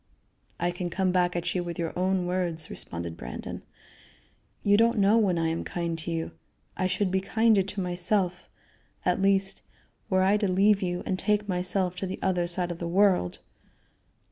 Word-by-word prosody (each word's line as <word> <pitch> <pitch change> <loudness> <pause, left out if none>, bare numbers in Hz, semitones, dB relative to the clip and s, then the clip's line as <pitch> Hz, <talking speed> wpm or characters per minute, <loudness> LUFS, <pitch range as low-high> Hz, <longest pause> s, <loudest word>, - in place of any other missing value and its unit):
"I 175 +1 +1
can 175 0 -4
come 185 +1 0
back 180 -1 +1
at 175 - -1
you 180 - -1
with 170 -1 -5
your 165 -1 -2
own 185 0 +1
words," 175 -3 -2
responded 85 -1 -4
Brandon. - - -7 1.0
"You 205 0 +4
don't 230 +2 +3
know 205 +3 +5
when 190 -5 +2
I 165 -1 +1
am 165 - -2
kind 170 -1 -3
to 160 - -6
you. 165 -1 -2 0.4
I 185 - 0
should 185 +1 0
be 190 0 +1
kinder 220 +1 +3
to 195 +2 -5
myself, 180 0 0 0.6
at 180 +1 +1
least, 195 0 +1 0.5
were 185 -2 +3
I 200 +2 +4
to 205 -1 0
leave 195 +2 +3
you 175 -1 -2
and 185 - -1
take 210 0 +1
myself 180 0 0
to 190 - -3
the 185 - -4
other 180 -2 0
side 175 0 -1
of 170 - -6
the 170 - -3
world." 180 - +2
185 Hz, 185 wpm, -27 LUFS, 175-195 Hz, 1.0 s, know